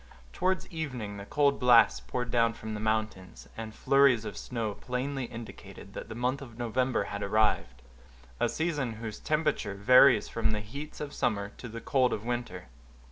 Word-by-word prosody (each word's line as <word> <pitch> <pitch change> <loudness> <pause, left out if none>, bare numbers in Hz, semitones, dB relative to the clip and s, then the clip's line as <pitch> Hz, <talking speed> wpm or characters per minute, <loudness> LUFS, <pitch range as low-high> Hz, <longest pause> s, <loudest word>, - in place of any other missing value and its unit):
Towards 185 - 0
evening 125 -11 -4
the 100 0 -9
cold 145 -1 +2
blasts 125 -2 +6
poured 125 -2 -4
down 115 -1 +3
from 110 0 -7
the 105 - -4
mountains, 110 -3 -2
and 110 -1 -6
flurries 135 -5 +4
of 105 -2 -5
snow 110 -1 -3
plainly 130 +3 -3
indicated 115 -1 -10
that - - -7
the 110 - -6
month 125 +4 -1
of 120 -4 -11
November 120 0 0
had 100 0 -5
arrived; 100 -11 +1 0.6
a - - +2
season 150 -7 -1
whose 110 -1 -7
temperature 155 -10 0
varies 125 +2 +6
from 115 -1 -1
the 105 - -1
heats 140 +10 -8
of 145 -1 -5
summer 100 -3 -1
to 120 - -8
the 115 +1 -7
cold 130 -2 +2
of 105 - -4
winter. 120 - -4
115 Hz, 175 wpm, -29 LUFS, 110-130 Hz, 0.6 s, blasts